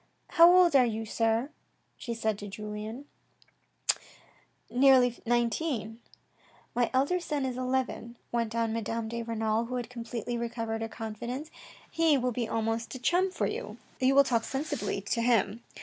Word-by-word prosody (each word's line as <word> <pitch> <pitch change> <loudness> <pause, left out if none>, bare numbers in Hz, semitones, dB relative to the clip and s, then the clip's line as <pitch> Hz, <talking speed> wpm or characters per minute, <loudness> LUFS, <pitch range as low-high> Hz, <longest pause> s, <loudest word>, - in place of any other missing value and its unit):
" - - -43
How 340 +1 +10
old 355 -4 +6
are 265 - +7
you, 225 -2 -2
sir, 225 +5 0 0.4
she 235 -2 -5
said 220 -2 -1
to 205 - -7
Julien? 210 +5 -6 0.6
" - - -3
" - - -32
Nearly 250 -2 +5
nineteen." 235 -1 0 0.4
" - - -31
My 240 -1 +2
elder 280 +8 +2
son 300 -5 -2
is 255 -1 -2
eleven," 255 -2 -2
went 230 -1 -1
on 230 -1 0
Madame 225 0 -2
de 235 +1 -3
Renal, 225 0 -1
who 250 +2 -5
had 245 -1 -4
completely 235 0 -4
recovered 230 -1 -3
her 225 - -3
confidence. 240 +7 -6 0.2
" - - -23
He 320 -3 +5
will 250 -1 0
be 235 -1 -2
almost 225 +1 -2
a - - -6
chum 360 +8 +2
for 370 - -2
you. - - -4 0.2
You 260 +1 +3
will 280 - +8
talk 235 -4 +1
sensibly 275 +5 -3
to 230 - -1
him. 230 -1 +2
235 Hz, 175 wpm, -29 LUFS, 225-260 Hz, 0.6 s, How